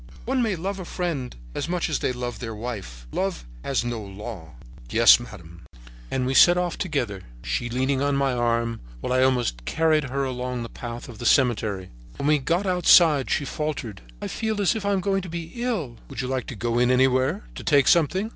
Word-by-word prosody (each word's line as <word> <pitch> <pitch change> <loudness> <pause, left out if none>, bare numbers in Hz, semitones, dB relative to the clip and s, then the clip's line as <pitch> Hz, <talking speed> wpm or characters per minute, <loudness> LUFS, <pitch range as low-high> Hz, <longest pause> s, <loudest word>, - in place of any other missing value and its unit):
"'One 260 +2 +1
may 220 -5 +1
love 190 +3 -4
a - - -5
friend 165 -9 -3 0.2
as - - -3
much 180 -1 0
as 155 - -1
they - - 0
love 125 -2 -5
their 115 -2 -5
wife. 100 - -6
Love - - -2 0.2
has 130 -3 0
no 120 -2 -3
law.' 100 - -8 0.3
"'Yes, - - +7
madame.' 85 0 -11 0.5
"And 130 -1 -1
we 130 - 0
set 175 +5 +7
off 180 -1 0
together, 125 - -2 0.2
she - - -2
leaning 130 +2 0
on 140 0 +1
my 140 -1 +1
arm, 115 -1 0 0.2
while 125 - -2
I 130 - +3
almost 125 - +1
carried 155 - +2
her 135 +1 -2
along 125 -2 -3
the 115 - -7
paths 120 0 -7
of 120 -3 -11
the 120 - -6
cemetery. 105 -7 +2 0.3
When - - -3
we 150 0 +4
got 170 +8 0
outside 175 -6 +5
she 145 - 0
faltered: 145 -9 -4 0.2
"'I - - -2
feel 220 -2 -2
as 200 +1 +3
if 205 -2 -3
I 200 - +2
were 190 - 0
going 195 +1 0
to 180 - -8
be 165 0 -6
ill.' 215 - -3
"'Would - - -4
you 125 - -3
like 130 -2 -2
to - - -6
go 120 +3 -1
in 125 0 +3
anywhere, 130 +8 +2
to - - -8
take 140 -3 +4
something?' 180 +6 +3
130 Hz, 210 wpm, -24 LUFS, 120-170 Hz, 0.5 s, Yes